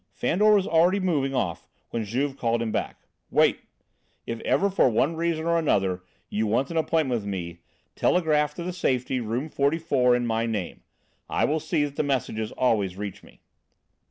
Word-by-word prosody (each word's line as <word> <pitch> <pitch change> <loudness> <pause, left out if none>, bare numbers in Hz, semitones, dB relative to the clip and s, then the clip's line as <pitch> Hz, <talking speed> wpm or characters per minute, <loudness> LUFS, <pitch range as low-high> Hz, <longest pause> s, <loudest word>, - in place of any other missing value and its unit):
Fandor 210 +4 +3
was 195 -2 +2
already 175 +4 +3
moving 145 -8 0
off 90 -9 -2 0.2
when 115 -2 -2
Juve 135 +6 -1
called 115 -2 0
him 115 -1 -2
back. - - -4 0.2
"Wait! - - +3 0.7
If 115 0 -4
ever 200 - +1
for 185 - +4
one 140 +8 +1
reason 165 -1 -1
or 170 0 +2
another 95 - +1 0.3
you 110 +1 -1
want 120 +7 0
an 165 - -2
appointment 155 -6 +1
with 100 - -8
me, 85 -3 -5 0.4
telegraph 150 -4 +2
to 175 - -5
the 180 +1 -4
Safety, 130 -6 0
room 120 +5 -2
44, 140 -4 +2
in 120 0 0
my 115 0 0
name. 105 -6 -4 0.5
I - - +1
will 155 +2 0
see 155 -1 0
that 145 -1 -8
the - - +2
messages 125 -6 -2
always 105 -7 +1
reach 105 -1 -6
me." - - -19
135 Hz, 180 wpm, -25 LUFS, 110-160 Hz, 0.7 s, for